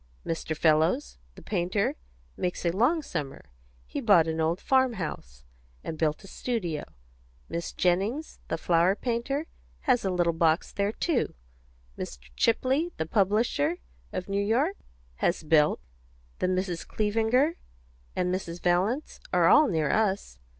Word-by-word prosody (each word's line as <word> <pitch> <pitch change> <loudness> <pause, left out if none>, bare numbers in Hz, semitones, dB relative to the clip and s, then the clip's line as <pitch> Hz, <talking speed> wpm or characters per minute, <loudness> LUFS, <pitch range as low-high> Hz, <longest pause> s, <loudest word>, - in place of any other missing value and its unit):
Mr. 160 -1 -3
Fellows, 160 - +2 0.2
the - - -13
painter, 185 +1 0 0.4
makes 180 0 -3
a 170 - +3
long 255 - +2
summer; 135 - -5 0.3
he - - -4
bought 200 -8 +6
an 160 0 -1
old 165 +3 +1
farm 260 -3 +3
house, 65 - -6 0.4
and 160 - -4
built 155 +1 0
a - - -11
studio; 185 -10 -3 0.7
Miss 170 0 -3
Jennings, 200 - 0
the - - -1
flower 170 +3 +3
painter, 250 +6 -2 0.4
has 255 -4 +2
a 195 - 0
little 175 -2 +1
box 165 0 +2
there, 200 +1 0
too; 295 +3 -1 0.6
Mr. 60 0 -7
Chapley, 265 +8 +2
the 160 - -1
publisher, 225 - +1 0.3
of 185 - -4
New 200 0 0
York, 265 - +1 0.4
has 175 - 0
built; 150 -1 +4 0.6
the - - +1
Misses 185 -2 -1
Clevinger, 225 +9 +1 0.6
and 180 0 0
Mrs. 175 -2 -4
Valence, 190 - 0
are - - +4
all 305 0 +7
near 160 -7 +1
us. 195 - 0
190 Hz, 140 wpm, -28 LUFS, 165-240 Hz, 0.7 s, all